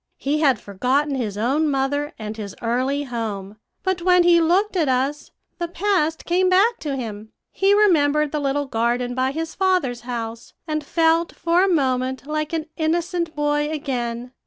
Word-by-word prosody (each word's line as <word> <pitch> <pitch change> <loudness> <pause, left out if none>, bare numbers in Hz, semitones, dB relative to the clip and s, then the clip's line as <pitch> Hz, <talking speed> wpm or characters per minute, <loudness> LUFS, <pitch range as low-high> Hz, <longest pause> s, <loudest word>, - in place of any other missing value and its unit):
He 290 +2 -1
had 270 -7 +3
forgotten 255 +10 0
his 220 -7 -3
own 275 +8 +1
mother 285 +2 -1
and 215 0 -6
his 205 -3 -7
early 255 +5 0
home; 215 -6 -5 0.3
but 375 -2 -1
when 360 0 +5
he 345 -1 +5
looked 375 +6 +2
at 320 -6 +2
us, 270 +3 -1 0.3
the 345 - -1
past 345 -3 0
came 365 +2 +2
back 415 +6 +3
to 290 -3 -3
him. 220 -4 -6 0.2
He 390 +1 +3
remembered 300 -8 +3
the 300 - -1
little 285 0 0
garden 245 0 -1
by 260 +1 0
his 320 +3 -4
father's 365 -11 0
house, 235 -1 -6
and 305 -1 -2
felt 330 +2 +1
for 340 +2 +2
a - - +3
moment 260 -4 0
like 305 0 -2
an 325 -2 -2
innocent 335 0 -1
boy 295 0 0
again. 245 -5 -3
290 Hz, 170 wpm, -22 LUFS, 250-335 Hz, 0.3 s, when